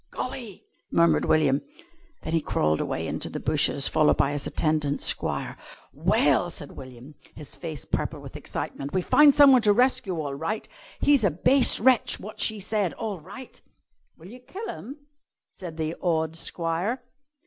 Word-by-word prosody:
"Golly!" 245 Hz, -6 st, -7 dB, 0.2 s
murmured 170 Hz, 0 st, +3 dB
William. 145 Hz, -3 st, +2 dB, 0.6 s
Then 160 Hz, -, -4 dB
he 165 Hz, -, +2 dB
crawled 75 Hz, -, 0 dB
away -, -, -3 dB
into -, -, -4 dB
the -, -, -5 dB
bushes, 140 Hz, -, +2 dB
followed 155 Hz, -1 st, +3 dB
by 140 Hz, -, +2 dB
his 145 Hz, -1 st, -3 dB
attendant 155 Hz, -2 st, -1 dB
squire. -, -, -1 dB, 0.4 s
"Well," -, -, +2 dB
said -, -, -8 dB
William, 130 Hz, +2 st, -12 dB, 0.2 s
his 150 Hz, -2 st, -8 dB
face 160 Hz, -6 st, -6 dB
purple -, -, -3 dB
with -, -, -11 dB
excitement, 140 Hz, +1 st, -6 dB
"we've 185 Hz, -, 0 dB
found 295 Hz, -2 st, +6 dB
someone 275 Hz, -4 st, +7 dB
to 210 Hz, -2 st, +4 dB
rescue 250 Hz, -6 st, +1 dB
all 145 Hz, -3 st, -3 dB
right. 165 Hz, +9 st, -4 dB, 0.3 s
He's 285 Hz, -5 st, +4 dB
a 200 Hz, -, +4 dB
base 250 Hz, -, +3 dB
wretch, 255 Hz, +1 st, +3 dB
wot 210 Hz, +2 st, -8 dB
she 220 Hz, -1 st, -1 dB
said, 200 Hz, -2 st, -1 dB
all 210 Hz, -5 st, -5 dB
right." 200 Hz, -, -12 dB, 0.6 s
"Will 170 Hz, +3 st, -13 dB
you 250 Hz, +4 st, -11 dB
kill 370 Hz, -, -8 dB
him?" 275 Hz, 0 st, -8 dB, 0.6 s
said 170 Hz, -4 st, -9 dB
the 160 Hz, +1 st, -2 dB
awed 160 Hz, -2 st, 0 dB
squire. 170 Hz, +9 st, -3 dB
175 Hz, 160 wpm, -25 LUFS, 155-245 Hz, 0.6 s, someone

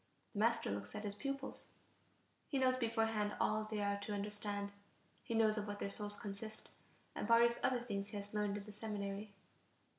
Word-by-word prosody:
The 205 Hz, -, -2 dB
master 230 Hz, -, +3 dB
looks 100 Hz, 0 st, -4 dB
at 210 Hz, -, -3 dB
his 205 Hz, -1 st, -2 dB
pupils; 275 Hz, +5 st, -4 dB, 0.7 s
he 280 Hz, -, 0 dB
knows 260 Hz, -1 st, +5 dB
beforehand 225 Hz, -3 st, +1 dB
all 215 Hz, 0 st, +3 dB
they 215 Hz, -1 st, -1 dB
are 200 Hz, 0 st, +1 dB
to 205 Hz, +1 st, -3 dB
understand; 205 Hz, 0 st, -1 dB, 0.5 s
he 230 Hz, -, -2 dB
knows 220 Hz, -1 st, +5 dB
of 210 Hz, -, -3 dB
what 205 Hz, 0 st, -3 dB
their 200 Hz, -, -2 dB
souls 205 Hz, 0 st, -4 dB
consist, 210 Hz, +2 st, -5 dB, 0.4 s
and -, -, -2 dB
various 235 Hz, 0 st, +6 dB
other 250 Hz, -2 st, +3 dB
things 200 Hz, -4 st, -2 dB
he 205 Hz, -, -4 dB
has 205 Hz, +1 st, -6 dB
learned 210 Hz, -1 st, +1 dB
in 205 Hz, -, -5 dB
the 210 Hz, -, -9 dB
seminary. 205 Hz, -1 st, -3 dB
210 Hz, 185 wpm, -39 LUFS, 205-225 Hz, 0.7 s, various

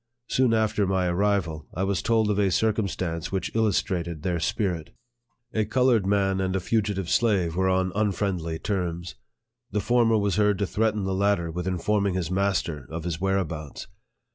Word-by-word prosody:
Soon 130 Hz, -2 st, +3 dB
after 110 Hz, -3 st, +1 dB
my 95 Hz, -1 st, +1 dB
arrival, 90 Hz, -4 st, 0 dB
I 95 Hz, -, -1 dB
was 95 Hz, -3 st, 0 dB
told 110 Hz, -2 st, +2 dB
of 105 Hz, -, 0 dB
a 100 Hz, -2 st, +3 dB
circumstance 95 Hz, -5 st, -1 dB
which 95 Hz, -1 st, -2 dB
illustrated 85 Hz, -7 st, 0 dB
their 90 Hz, -2 st, 0 dB
spirit. 85 Hz, -3 st, -2 dB, 0.6 s
A 110 Hz, -, +2 dB
colored 115 Hz, -2 st, +2 dB
man 95 Hz, -1 st, +2 dB
and 95 Hz, 0 st, -1 dB
a -, -, +2 dB
fugitive 100 Hz, -2 st, -1 dB
slave 95 Hz, -7 st, +2 dB
were 95 Hz, +1 st, +2 dB
on 95 Hz, 0 st, +1 dB
unfriendly 95 Hz, -5 st, -1 dB
terms. 90 Hz, -3 st, -3 dB, 0.6 s
The 105 Hz, -, -1 dB
former 115 Hz, +2 st, +3 dB
was 100 Hz, -1 st, 0 dB
heard 105 Hz, -1 st, +3 dB
to 100 Hz, -, 0 dB
threaten 105 Hz, +1 st, 0 dB
the 95 Hz, 0 st, -1 dB
latter 95 Hz, -3 st, +1 dB
with 90 Hz, +2 st, -4 dB
in 90 Hz, -1 st, 0 dB
forming 100 Hz, +1 st, +1 dB
his 90 Hz, -2 st, -2 dB
master 90 Hz, -8 st, -1 dB
of 80 Hz, 0 st, -5 dB
his 85 Hz, -1 st, -3 dB
whereabouts. 85 Hz, -6 st, -2 dB
95 Hz, 170 wpm, -26 LUFS, 85-105 Hz, 0.6 s, Soon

